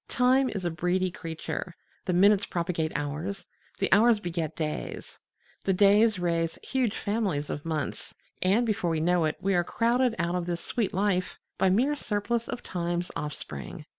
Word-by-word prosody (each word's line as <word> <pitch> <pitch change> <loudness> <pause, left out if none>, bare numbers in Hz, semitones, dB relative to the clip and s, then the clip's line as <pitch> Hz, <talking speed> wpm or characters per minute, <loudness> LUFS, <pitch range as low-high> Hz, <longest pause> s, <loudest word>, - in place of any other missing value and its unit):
Time 255 +2 +3
is 195 -4 -4
a 175 - 0
breedy 180 +3 0
creature: 165 +1 -5 0.3
the - - 0
minutes 200 +3 +4
propagate 170 -2 -1
hours, 155 +6 -3 0.3
the - - +2
hours 220 +2 +5
beget 170 -5 -3
days, 155 -2 -4 0.4
the 195 - +2
days 205 +2 +5
raise 170 -2 0
huge 250 -5 0
families 200 -9 -1
of 145 - -4
months, 155 -3 -3 0.3
and 200 +6 +3
before 205 -6 0
we 160 -1 0
know 175 +1 +2
it 155 - -1
we 195 +1 0
are 175 -1 +3
crowded 235 +4 +1
out 170 -1 0
of 180 -1 -2
this 170 -1 -1
sweet 230 -5 -1
life 190 -1 0 0.2
by 190 - +4
mere 255 +10 +3
surplus 235 -1 -1
of - - -5
Time's 175 0 -2
offspring. 110 - -6
185 Hz, 165 wpm, -28 LUFS, 170-210 Hz, 0.4 s, hours